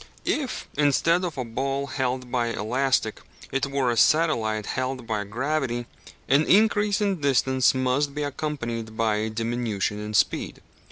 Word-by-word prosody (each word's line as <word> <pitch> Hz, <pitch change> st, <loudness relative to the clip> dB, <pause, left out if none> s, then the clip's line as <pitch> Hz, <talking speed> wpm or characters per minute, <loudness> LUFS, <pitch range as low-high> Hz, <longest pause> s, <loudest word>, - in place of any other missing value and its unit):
If, 280 Hz, -4 st, -2 dB
instead 165 Hz, +5 st, +3 dB
of 170 Hz, -5 st, -3 dB
a 130 Hz, -, -2 dB
ball 135 Hz, +4 st, -2 dB
held 130 Hz, -2 st, -3 dB
by 120 Hz, -2 st, +1 dB
elastic, 115 Hz, +1 st, 0 dB, 0.3 s
it 135 Hz, +1 st, 0 dB
were 135 Hz, -3 st, 0 dB
a -, -, -1 dB
satellite 115 Hz, -9 st, +3 dB
held 130 Hz, -1 st, -3 dB
by 110 Hz, -2 st, -2 dB
gravity, 120 Hz, +2 st, -2 dB, 0.4 s
an 140 Hz, +3 st, +4 dB
increase 210 Hz, 0 st, +3 dB
in 195 Hz, -5 st, 0 dB
distance 130 Hz, -2 st, +3 dB
must 130 Hz, +2 st, 0 dB
be 150 Hz, -, -2 dB
accompanied 120 Hz, -6 st, -4 dB
by 110 Hz, -2 st, +2 dB
a 110 Hz, +1 st, -1 dB
diminution 110 Hz, -2 st, -2 dB
in 105 Hz, 0 st, -4 dB
speed. 90 Hz, -, +1 dB
130 Hz, 150 wpm, -25 LUFS, 115-145 Hz, 0.4 s, an